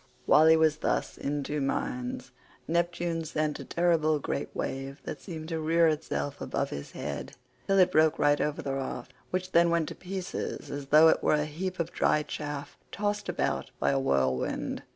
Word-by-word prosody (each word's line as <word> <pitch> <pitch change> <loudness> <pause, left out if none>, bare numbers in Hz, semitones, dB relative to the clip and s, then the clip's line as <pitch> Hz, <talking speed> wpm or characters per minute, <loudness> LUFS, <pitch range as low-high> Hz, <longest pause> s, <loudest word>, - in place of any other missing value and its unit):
While 155 +1 +6
he 160 0 +7
was 160 -1 +3
thus - - -1
in 145 0 -2
two 150 +1 -2
minds, 125 -1 -3 0.4
Neptune 170 0 0
sent 155 -1 -2
a - - -6
terrible 165 -3 +2
great 140 0 -3
wave 135 +1 -4
that - - -6
seemed 160 -4 -7
to 165 -1 -2
rear 165 +1 +3
itself 150 -2 -3
above - - -2
his 70 0 -7
head - - -5 0.3
till 195 - +3
it 185 -2 +5
broke 155 0 +4
right 145 0 +3
over 150 0 -1
the 135 - -2
raft, 135 -1 -5 0.2
which 185 0 -2
then 170 0 +5
went 170 -2 +1
to - - -6
pieces 185 0 -5
as 140 -1 -5
though 155 +3 +7
it - - +2
were - - +3
a 150 0 0
heap 180 +5 -4
of 170 0 -1
dry 150 - +2
chaff 145 -1 -6
tossed 205 0 -2
about - - -1
by - - +2
a 135 - +2
whirlwind. 65 - 0
155 Hz, 190 wpm, -29 LUFS, 145-170 Hz, 0.4 s, he